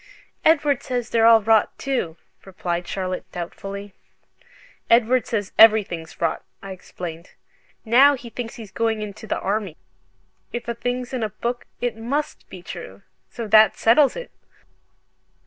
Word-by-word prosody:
"Edward 295 -4 +3
says 245 -3 -3
they're 230 -1 +4
all 225 -2 +7
rot, 220 0 +3
too," 245 -12 -2 0.3
replied 175 -2 -4
Charlotte, 185 -1 -4
doubtfully. 195 +3 -7 1.0
"Edward 240 +2 +4
says 205 -5 -2
everything's 200 -7 +4
rot," 165 - -1 0.2
I 195 - -9
explained, 175 -2 -8 0.5
"now 265 +6 +6
he 240 -3 -11
thinks 235 -1 -6
he's 220 -4 -10
going 225 -1 -1
into 210 +1 -8
the - - -1
Army. 200 -4 -2 0.7
If 240 - -5
a 235 - -1
thing's 245 +2 -4
in 255 - -2
a 220 - -1
book 240 +4 -4
it 245 -2 -1
MUST 265 +7 -4
be 180 -2 -11
true, 100 - -9 0.3
so 230 -2 -6
that 215 +1 +6
settles 265 +5 +4
it!" - - -7
220 Hz, 145 wpm, -22 LUFS, 190-245 Hz, 1.0 s, all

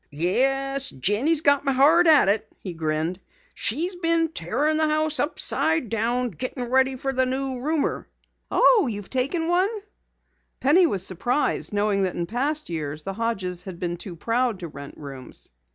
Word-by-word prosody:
"Yes, 270 - +3
Jenny's 235 - +1
got 285 -2 +3
me 275 - 0
hard 310 +6 +4
at 305 -9 +6
it," 210 +2 -1
he 185 - -6
grinned. 160 +2 -3 0.3
"She's 325 - -1
been 330 -2 +1
tearin' 290 - -1
the 315 0 +3
house 310 0 +2
upside 320 -2 +1
down 235 +3 -1
gettin' 245 - -5
ready 265 0 +2
for 270 +1 -3
the 260 0 +2
new 260 0 -3
roomer." 305 +2 -2 0.4
"Oh, 475 -4 +4
have - - -1
you 205 -2 -5
taken 275 - -2
one?" 360 +3 +2 0.9
Penny 335 +7 +4
was 190 - -1
surprised, 240 - -1
knowing 205 -1 0
that 185 -2 -1
in 170 - -2
past 280 - -2
years 155 -2 -5
the 195 - -5
Hodges 190 -5 -3
had 185 -3 -8
been 175 -2 -3
too 175 0 -9
proud 230 +2 -1
to 170 - -5
rent 140 -2 -11
rooms. 135 - -10
250 Hz, 170 wpm, -23 LUFS, 185-295 Hz, 0.9 s, at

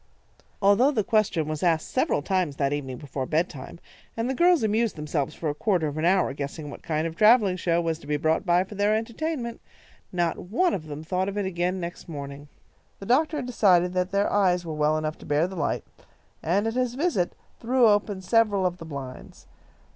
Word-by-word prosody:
Although 205 +7 +5
the 235 -8 0
question 210 -8 +1
was 155 -1 -3
asked 165 -3 +1
several 145 - 0
times 185 -6 0
that 140 0 0
evening 135 -3 -4
before 135 -1 -5
bedtime, 155 -2 -2 0.4
and 230 +1 -1
the 265 - 0
girls 345 0 +4
amused 220 +1 +1
themselves 150 -2 -3
for 165 - -4
a 145 - 0
quarter 180 0 0
of 145 -1 -3
an 155 +1 -1
hour 180 -6 +3
guessing 145 +1 -6
what - - -10
kind 155 0 -1
of 165 - -3
a - - -21
travelling 215 -2 +5
show 170 -1 +1
was 165 -2 -1
to 145 - -14
be 150 0 0
brought 160 +2 +1
by 175 -1 +3
for 190 - -11
their 205 +1 +2
entertainment, 235 +2 -3 0.5
not 175 -2 0
one 300 - 0
of 155 -4 -4
them 150 +1 -7
thought 185 +3 -1
of 200 - -6
it 205 - 0
again 180 0 -1
next 175 0 -7
morning. 140 -1 -7 0.5
The 195 - -9
doctor 300 +7 +2
had 270 - -3
decided 180 -7 +3
that 180 0 0
their 200 +1 0
eyes 180 -3 +2
were 160 - -4
well 150 0 +1
enough 155 0 -3
to - - -12
bear 150 +3 +2
the 190 +1 -6
light, 165 - -1 0.6
and, 190 +6 +1
at 225 - -1
his 250 -1 -1
visit, 280 - 0 0.3
threw 245 +1 +3
open 205 -2 +1
several 205 -1 +2
of 180 -1 -1
the 165 - -8
blinds. 140 -4 -9
180 Hz, 215 wpm, -26 LUFS, 155-215 Hz, 0.6 s, Although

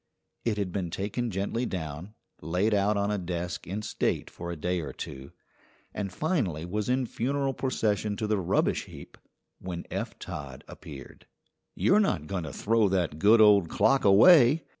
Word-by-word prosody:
It 110 -3 -1
had 100 -3 -2
been 90 -2 -3
taken 105 +7 -3
gently 100 +4 -2
down, 85 +3 -6 0.3
laid 90 +7 0
out 100 +1 +2
on 100 +1 0
a 105 - -1
desk 90 0 -4
in 100 +4 -4
state - - -2
for 85 0 -7
a - - -4
day 90 +3 -2
or 75 -5 -5
two, 65 +1 -8 0.6
and 100 -2 -4
finally 100 - -1
was 105 +5 -3
in 130 0 +1
funeral 135 +3 -1
procession 105 -6 -1
to 110 - -2
the 105 -1 0
rubbish 90 - 0
heap - - -12 0.4
when 90 -2 -6
Eph - - -4
Todd 65 -3 -8
appeared. 70 -1 -12 0.5
"You're 205 - +3
not 195 - 0
going 90 -1 -4
to 75 - -6
throw 110 +3 +1
that 85 -5 -1
good 110 +4 +6
old 100 -5 +6
clock 110 +7 +2
away?" 130 - +6
100 Hz, 170 wpm, -28 LUFS, 85-110 Hz, 0.6 s, good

